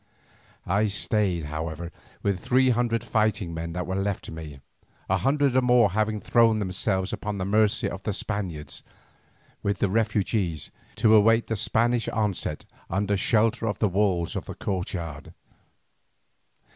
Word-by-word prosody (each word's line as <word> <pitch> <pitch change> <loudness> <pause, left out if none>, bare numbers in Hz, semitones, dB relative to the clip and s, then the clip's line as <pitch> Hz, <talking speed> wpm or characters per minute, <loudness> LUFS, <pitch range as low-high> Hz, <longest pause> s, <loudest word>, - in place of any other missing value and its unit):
I 100 +4 +2
stayed, 100 -3 0
however, 80 +3 -5 0.3
with 100 -2 0
the - - -19
three 130 0 +4
hundred 115 -1 0
fighting 110 -5 0
men 80 0 -4
that 90 0 -3
were 95 - -3
left 95 0 -1
to - - -9
me, 80 -4 -8 0.5
a 95 - +2
hundred 135 +5 +2
or 130 - +5
more 125 -5 +4
having 110 +1 0
thrown 115 0 +3
themselves 95 -1 -1
upon 105 -1 -3
the 95 - -2
mercy 105 +1 +2
of 95 - -5
the 105 - -2
Spaniards, 95 -7 -4 0.8
with 100 -1 -1
the 100 - +1
refugees, 105 -6 0 0.2
to 110 - +4
await 115 +2 +5
the 110 - -2
Spanish 115 +3 +1
onset 100 -8 -2 0.2
under 100 +2 0
shelter 115 +3 +2
of 105 - -1
the 110 - +2
walls 95 -3 0
of - - -3
the - - -7
courtyard. 85 -6 -4
100 Hz, 155 wpm, -26 LUFS, 90-110 Hz, 0.8 s, or